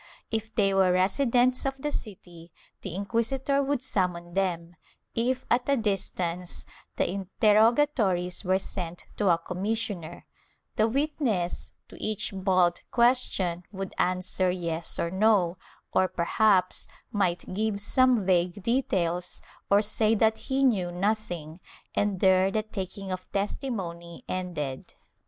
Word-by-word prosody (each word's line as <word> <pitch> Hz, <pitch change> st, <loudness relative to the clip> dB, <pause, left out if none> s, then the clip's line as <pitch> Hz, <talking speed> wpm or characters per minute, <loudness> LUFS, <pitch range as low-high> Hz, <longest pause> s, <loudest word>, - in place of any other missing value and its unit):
If 220 Hz, 0 st, -3 dB
they 195 Hz, -2 st, +3 dB
were 190 Hz, -1 st, +4 dB
residents 245 Hz, +7 st, +2 dB
of 270 Hz, 0 st, -2 dB
the 295 Hz, +2 st, -3 dB
city, 175 Hz, -, -8 dB, 0.3 s
the 185 Hz, -3 st, -6 dB
inquisitor 235 Hz, +7 st, 0 dB
would 275 Hz, -2 st, -1 dB
summon 180 Hz, -7 st, -1 dB
them; 175 Hz, -3 st, -1 dB, 0.4 s
if 250 Hz, +3 st, 0 dB
at 245 Hz, +3 st, +2 dB
a 280 Hz, -, +4 dB
distance, 180 Hz, -5 st, -2 dB, 0.3 s
the -, -, +1 dB
interrogatories 205 Hz, -, +2 dB
were 185 Hz, 0 st, +2 dB
sent 180 Hz, -3 st, -6 dB
to 205 Hz, -3 st, +2 dB
a 170 Hz, -, +5 dB
commissioner; 190 Hz, 0 st, -3 dB, 0.5 s
the 220 Hz, -, +3 dB
witness, 240 Hz, -, -1 dB, 0.2 s
to -, -, -13 dB
each 215 Hz, -2 st, -1 dB
bald 185 Hz, -2 st, +2 dB
question, 235 Hz, -8 st, +2 dB
would 195 Hz, -1 st, -5 dB
answer 185 Hz, 0 st, +1 dB
yes 170 Hz, -2 st, -2 dB
or 170 Hz, -, -1 dB
no, 190 Hz, -3 st, +3 dB, 0.3 s
or 185 Hz, -, +4 dB
perhaps 185 Hz, +2 st, +2 dB, 0.2 s
might 185 Hz, -3 st, -1 dB
give 210 Hz, +1 st, -1 dB
some 250 Hz, 0 st, +3 dB
vague 180 Hz, +1 st, +1 dB
details 180 Hz, -8 st, 0 dB, 0.3 s
or 200 Hz, +1 st, +5 dB
say 215 Hz, +1 st, +2 dB
that 220 Hz, +1 st, +2 dB
he 270 Hz, +1 st, +2 dB
knew 195 Hz, -9 st, +2 dB
nothing, 175 Hz, -4 st, -2 dB, 0.3 s
and 205 Hz, -3 st, 0 dB
there 190 Hz, 0 st, +5 dB
the 215 Hz, +2 st, -1 dB
taking 195 Hz, -2 st, -6 dB
of 185 Hz, 0 st, -6 dB
testimony 190 Hz, -6 st, -4 dB
ended. 160 Hz, -8 st, -4 dB
195 Hz, 130 wpm, -27 LUFS, 180-225 Hz, 0.5 s, a